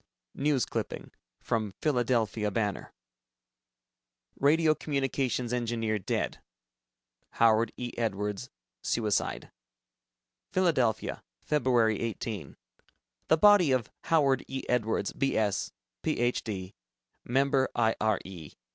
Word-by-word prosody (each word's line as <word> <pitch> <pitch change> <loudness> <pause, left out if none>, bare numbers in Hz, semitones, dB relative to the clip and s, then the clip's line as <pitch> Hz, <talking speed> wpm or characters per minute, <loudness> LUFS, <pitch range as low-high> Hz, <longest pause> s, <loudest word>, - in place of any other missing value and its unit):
(News 140 -3 +1
Clipping: - - -5 0.3
From 110 -4 -2
Philadelphia 120 -6 +1
Banner) 105 -1 -2 1.5
RADIO 155 +2 +4
COMMUNICATIONS 135 -4 -1
ENGINEER 115 -3 -1
DEAD 95 - -2 0.9
Howard 115 -1 +4
E. 120 -1 -5
Edwards, 105 +1 -2 0.3
Suicide 110 -3 -1 1.0
Philadelphia, 130 -12 +1 0.3
Feb. 120 -7 +2
18. 110 -7 -4 0.7
The 160 - +4
body 195 -4 +6
of 130 -3 0
Howard 140 -5 +3
E. 135 0 -4
Edwards, 110 -4 0
B.S., 110 -7 0 0.3
PhD., 105 -6 -1 0.5
Member 135 +1 +2
I. 115 -1 +2
R. 110 -2 +2
E. 85 -6 -10
120 Hz, 90 wpm, -29 LUFS, 110-135 Hz, 1.5 s, body